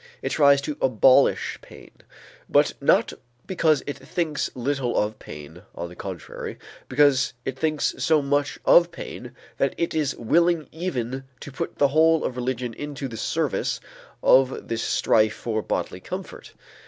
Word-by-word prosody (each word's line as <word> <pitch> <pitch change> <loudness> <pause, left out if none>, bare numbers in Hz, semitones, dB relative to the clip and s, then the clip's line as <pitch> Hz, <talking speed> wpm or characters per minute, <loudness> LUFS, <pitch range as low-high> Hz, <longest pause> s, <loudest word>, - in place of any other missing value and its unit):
It - - -1
tries 140 -2 +4
to 145 +1 -4
abolish 130 +2 +3
pain, - - -15 0.6
but - - +3
not - - +3 0.3
because 160 -6 +1
it 145 - -5
thinks 160 -4 -2
little 130 -1 -1
of 105 +1 -1
pain; 75 +3 -11
on 85 0 -5
the 90 - -12
contrary, 95 -4 -7 0.3
because 135 -1 +3
it 135 - -3
thinks 155 0 0
so 160 -2 +3
much 145 0 0
of 170 0 +6
pain 125 -7 -9 0.2
that 140 - +1
it 170 - -1
is 150 -3 0
willing 170 +6 +2
even 135 -6 -4 0.2
to 140 - -8
put 135 - -5
the 140 - +4
whole 160 +2 +4
of 125 - -2
religion 125 -1 -3
into 145 +1 -5
the 115 - -8
service - - -1 0.4
of 130 0 +3
this 115 0 -2
strife 110 -2 +2
for 110 -2 -2
bodily - - -3
comfort. - - -8
135 Hz, 155 wpm, -24 LUFS, 120-150 Hz, 0.6 s, of